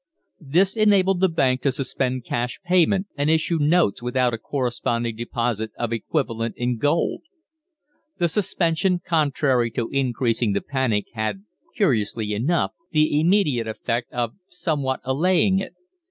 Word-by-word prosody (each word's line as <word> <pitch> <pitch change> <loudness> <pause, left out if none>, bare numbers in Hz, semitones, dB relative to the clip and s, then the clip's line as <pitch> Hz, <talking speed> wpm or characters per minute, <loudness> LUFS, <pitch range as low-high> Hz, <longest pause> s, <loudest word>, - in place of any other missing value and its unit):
This 175 +7 +2
enabled 195 -4 +3
the 190 0 +3
Bank 130 -6 +1
to 140 - +2
suspend 130 -1 -2
cash 120 +1 -3
payment, 185 +2 +3
and 145 +1 0
issue 160 +1 +1
notes 150 - +2
without 125 0 +1
a 115 - -3
corresponding 120 -3 -2
deposit 115 -1 -2
of 120 -1 -2
the 115 - 0
equivalent 115 -3 -2
in 120 -1 -1
gold. 145 +5 +1 1.0
The 175 - +2
suspension, 175 -1 0
contrary 140 -7 +1
to 115 0 -2
increasing 125 -5 0
the 100 - 0
panic, 130 -7 -1
had, 110 - -3 0.3
curiously 110 - 0
enough 140 +12 0 0.2
the 155 -2 +2
immediate 155 - +2
effect 115 +2 -3
of 120 -2 -2
somewhat 145 -7 -2
allaying 185 +8 +2
it. - - -6
135 Hz, 140 wpm, -23 LUFS, 120-170 Hz, 1.0 s, enabled